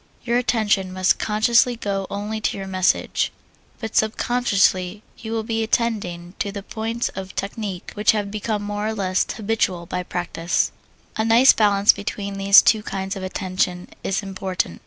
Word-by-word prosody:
Your 240 0 +1
attention 215 -6 +1
must 185 0 +2
consciously 235 +3 +3
go 200 -4 -3
only 210 +2 -4
to - - -1
your 195 - -5
message, 185 -1 +1 0.5
but 225 -1 -6
subconsciously 210 -4 +1 0.2
you 220 - -7
will 225 -1 -1
be 225 0 -1
attending 205 -7 -1
to 205 -5 -1
the 200 -1 -7
points 225 +3 -3
of 190 0 -8
technique 200 -2 -4
which 210 0 0
have 205 -2 -2
become 215 0 -2
more 205 +1 -3
or 220 - -2
less 185 -3 0
habitual 200 -5 -1
by 180 +2 -3
practise. 175 -1 -1 0.5
A 220 - +1
nice 230 +4 +6
balance 205 -1 +4
between 200 -1 -5
these 195 0 +8
two 220 -2 +4
kinds 195 -1 -4
of 195 - -6
attention 185 -1 -2
is 195 +1 -1
important. 190 - -3
205 Hz, 160 wpm, -22 LUFS, 190-220 Hz, 0.5 s, these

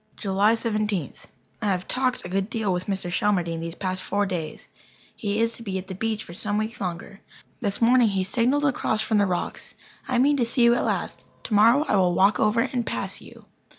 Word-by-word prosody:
July 200 +3 +2
Seventeenth. 215 - -2 0.3
I 210 - -1
have 185 -2 -1
"talked" 255 -1 0
a - - -3
good 195 +2 -1
deal 215 -5 -1
with 180 +1 -3
Mr. 190 -3 -2
Shelmardine 175 -3 0
these 165 +1 -5
past 185 -1 -2
four 205 0 0
days. 170 -5 -5 0.5
He 205 0 -2
is 230 0 +2
to 230 - -11
be 195 -4 -3
at 185 +1 -7
the - - -4
beach 220 +2 -2
for 170 - -11
some 205 +3 -1
weeks 215 +1 -3
longer. 180 +2 -5 0.4
This 205 -1 -1
morning 245 0 +5
he 195 -2 0
signalled 250 +9 +1
across 220 -5 0
from 220 -1 +1
the 200 - +3
rocks: 180 -1 -3 0.3
"I 255 - 0
mean 285 +4 +4
to 245 - +2
see 235 +1 +2
you 235 0 +6
at 240 - 0
last. - - -2 0.2
Tomorrow 230 +7 +4
I - - +2
will 180 -2 +3
walk 200 +4 +4
over 215 +2 +3
and 250 -1 -1
pass - - -3
you." - - -15
210 Hz, 215 wpm, -25 LUFS, 190-230 Hz, 0.5 s, you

